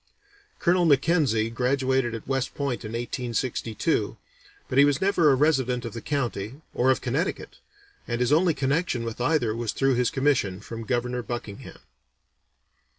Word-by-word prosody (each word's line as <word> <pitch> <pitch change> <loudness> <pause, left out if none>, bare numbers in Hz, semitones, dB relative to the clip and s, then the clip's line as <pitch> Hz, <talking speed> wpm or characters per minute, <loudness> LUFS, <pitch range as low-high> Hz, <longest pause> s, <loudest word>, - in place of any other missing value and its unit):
Colonel 175 -1 +2
Mackenzie 140 -7 +2
graduated 130 0 0
at 115 - -9
West 135 -1 -1
Point 140 -5 -2
in 110 0 -6
1862, 120 -1 -2 0.5
but 130 - +1
he - - +9
was 145 -1 +3
never 190 -5 +3
a - - +4
resident 130 -4 +1
of 115 - -6
the 115 - -6
county, 125 -3 -3
or 130 - +2
of 130 - +2
Connecticut, 140 +9 -3 0.5
and 120 0 -2
his 125 +3 +2
only 165 0 +3
connection 140 -2 0
with 115 +1 -5
either 125 -5 +1
was 115 -2 -2
through 135 0 +2
his 125 -1 +2
commission 130 -9 +1
from 115 +1 -8
Governor 125 +1 -1
Buckingham. 120 -4 -7
125 Hz, 155 wpm, -26 LUFS, 115-140 Hz, 0.5 s, he